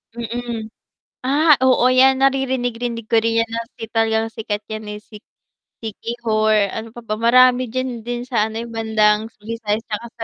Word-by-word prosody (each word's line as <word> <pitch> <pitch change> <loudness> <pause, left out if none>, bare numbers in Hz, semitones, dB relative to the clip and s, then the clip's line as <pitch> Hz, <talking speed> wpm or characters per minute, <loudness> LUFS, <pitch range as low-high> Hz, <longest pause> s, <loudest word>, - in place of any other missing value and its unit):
Mm, 235 -1 -5 0.6
ah, 300 +3 +4
oo 255 -1 +4
yan 265 0 +6
naririnig-rinig 245 -4 0
ko - - +4
rin 230 0 +1
yan 230 - -11
na 230 - -2 0.2
si - - -9
talagang 225 0 +1
sikat 210 -1 -4
yan 215 -1 -5
eh, - - -8
si 210 -2 -13 0.6
Siquijor, 215 -2 0
ano 225 +1 -5
pa 240 - -8
ba 215 -1 -2
marami 250 +1 +5
diyan 250 -1 -4
din 245 0 -3
sa, 225 -4 +1
ano, 225 +1 -5
bandang 220 -1 +2 0.2
Visayas 225 -1 -3
tsaka 220 +2 -4
sa 225 - -4
230 Hz, 165 wpm, -20 LUFS, 220-245 Hz, 0.6 s, yan